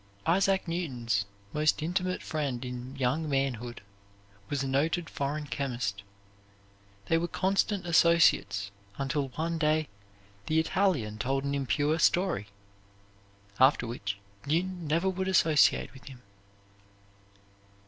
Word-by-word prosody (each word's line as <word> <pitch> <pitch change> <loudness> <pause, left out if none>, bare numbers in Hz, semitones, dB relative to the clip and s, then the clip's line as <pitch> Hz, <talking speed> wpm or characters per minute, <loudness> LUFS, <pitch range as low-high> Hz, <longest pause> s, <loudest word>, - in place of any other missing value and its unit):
Isaac 190 +2 +2
Newton's 125 - -1 0.3
most 150 0 +2
intimate 185 +2 -1
friend 140 -6 -3
in 125 +1 -6
young 135 +4 0
manhood 125 -5 -2 0.7
was 140 -1 -1
a - - -2
noted 155 +5 0
foreign 145 +2 -2
chemist. 120 -9 -3 1.0
They 165 - +2
were 170 - -1
constant 195 +1 0
associates 165 - +3 0.3
until 140 0 -1
one 165 +1 -2
day 155 0 +1 0.6
the 160 +1 +3
Italian 160 - 0
told 135 +2 0
an 140 0 -2
impure 145 +3 0
story, 175 - +2 1.1
after 130 -1 +5
which 100 -4 -4 0.3
Newton 175 +2 -1
never 165 +5 +1
would 190 0 -1
associate 160 -5 +3
with 130 - -15
him. 130 -3 -12
150 Hz, 115 wpm, -29 LUFS, 130-170 Hz, 1.1 s, after